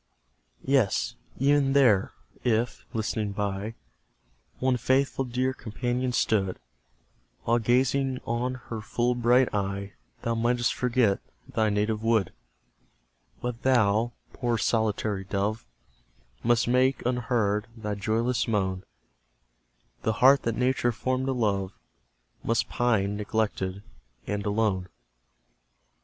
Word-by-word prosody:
Yes, 130 -7 +2 0.2
even 140 0 +3
there, 120 -9 +4 0.3
if, 115 0 0
listening 110 -3 -2
by, 100 +2 -3 0.8
One 130 0 +2
faithful 130 +2 +1
dear 130 +1 0
companion 125 +2 -2
stood, 100 -5 +1 0.9
While 120 +1 +2
gazing 130 +3 +2
on 120 +2 -1
her 115 -2 -4
full 120 +4 0
bright 120 +1 +3
eye, 100 0 -2 0.3
Thou 115 - 0
mightst 120 +1 +1
forget 120 -5 +2 0.3
thy 115 -5 +1
native 105 +1 0
wood 110 -5 +1 1.1
But 120 -1 -4
thou, 120 -2 +3 0.2
poor 120 -3 0
solitary 110 -2 0
dove, 100 - -2 0.7
Must 120 0 +2
make, 130 +1 +2
unheard, 115 -4 0
thy 105 -2 -3
joyless 110 +4 0
moan; 95 -4 0 1.2
The 110 - 0
heart 130 +4 +6
that 115 -1 -1
Nature 125 -1 +2
formed 130 +3 -1
to - - +1
love 100 -6 0 0.7
Must 115 0 +1
pine, 105 -5 +1
neglected, 100 -2 -2 0.4
and 105 0 -3
alone. 100 -3 0
115 Hz, 110 wpm, -27 LUFS, 105-125 Hz, 1.2 s, heart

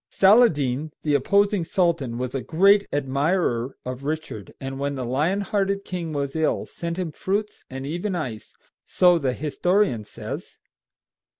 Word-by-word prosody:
Saladin, 155 - +4
the 150 - +1
opposing 200 +7 +3
sultan, 165 -9 0
was 125 0 -3
a 135 - -2
great 200 +7 +4
admirer 140 -2 0
of 130 +1 -5
Richard, 150 -9 -4
and 135 0 -5
when 140 0 -2
the 130 -2 -3
lion 150 +11 0
hearted 200 0 -1
king 175 -3 -4
was 140 -1 -3
ill, 160 -1 0
sent 170 0 -5
him 180 -4 -2
fruits 205 +6 -3
and 135 +1 -6
even 175 +6 -2
ice, 125 -10 -5 0.3
so 180 -2 +4
the 130 -4 0
historian 155 - +1
says. 105 - -8
155 Hz, 145 wpm, -24 LUFS, 135-185 Hz, 0.3 s, Saladin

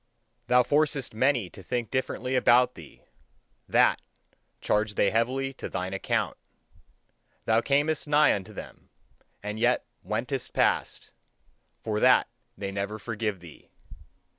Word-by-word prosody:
Thou 125 0 +5
forcest 145 -2 0
many 125 -2 +2
to - - -12
think 120 +3 -3
differently 130 0 -2
about 125 0 +4
thee; 80 -4 -14 0.7
that, - - +4 0.6
charge 105 0 0
they 100 - +2
heavily 130 +4 0
to - - -7
thine 90 +1 -4
account. 95 - -1 1.1
Thou 110 +1 +3
camest 145 +4 +1
nigh 150 0 +5
unto 95 -2 -5
them, - - -11 0.5
and 105 +1 -4
yet 120 +2 +2 0.2
wentest 120 +7 -3
past: - - 0 0.7
for 105 -1 -1
that 125 +2 +5 0.3
they 100 0 -4
never 100 +2 -3
forgive 105 -3 -3
thee. 85 -4 -14
115 Hz, 125 wpm, -27 LUFS, 105-130 Hz, 1.1 s, Thou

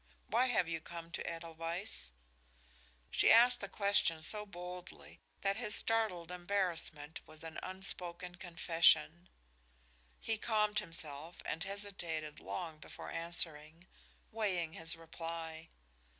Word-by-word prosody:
Why 240 +4 +3
have 220 -8 +3
you 165 -1 -2
come 170 0 -8
to - - -2
Edelweiss?" 165 - -4 1.0
She - - +6
asked 240 +2 +8
the 200 - -5
question 200 -6 +3
so 210 +4 -1
boldly 180 -1 -8 0.2
that 195 +1 +2
his 220 -3 0
startled 200 -7 +1
embarrassment 175 -4 -1
was 155 0 -12
an 160 -1 -5
unspoken 180 -2 -2
confession. 170 -1 +3 0.9
He 225 -1 -1
calmed 210 -2 +2
himself 165 -3 -4
and 165 +1 -1
hesitated 175 -7 -3
long 165 -4 -5
before - - -8
answering, 165 -1 -2 0.5
weighing 185 -7 0
his 165 0 -2
reply. 165 0 -6
175 Hz, 115 wpm, -36 LUFS, 165-200 Hz, 1.0 s, asked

